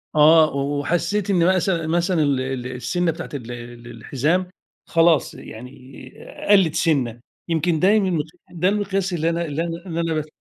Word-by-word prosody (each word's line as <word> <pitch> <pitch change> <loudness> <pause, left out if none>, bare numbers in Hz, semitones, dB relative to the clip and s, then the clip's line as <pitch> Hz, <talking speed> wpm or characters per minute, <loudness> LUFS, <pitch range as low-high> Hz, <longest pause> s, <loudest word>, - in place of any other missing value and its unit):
آه، 155 0 +6
وحسيت 155 +9 -1
إن 185 -1 +3
مثل 175 -3 0
مثلًا 170 0 +1
ال 140 -3 +1
ال 130 -1 -4
السِنّة 170 +7 -1
بتاعة 165 +2 -8
ال 120 -4 -6
ال 120 0 -9
الحزام 150 +10 -1 0.4
خلاص 165 -1 +3
يعني 120 +3 -10 0.8
قلِّت 190 -6 +5
سِنّة، 130 -8 0 0.3
يمكن 165 0 +1
دايمًا 190 -3 +3 0.3
ده 180 +2 +1
المقياس 195 -2 -1
اللي 165 -1 0
أنا 170 0 -1
اللي 150 0 -3
أنا 170 +2 -6
اللي 170 -2 -3
أنا 165 -1 -1
باس 155 -1 -2
165 Hz, 155 wpm, -22 LUFS, 145-180 Hz, 0.8 s, آه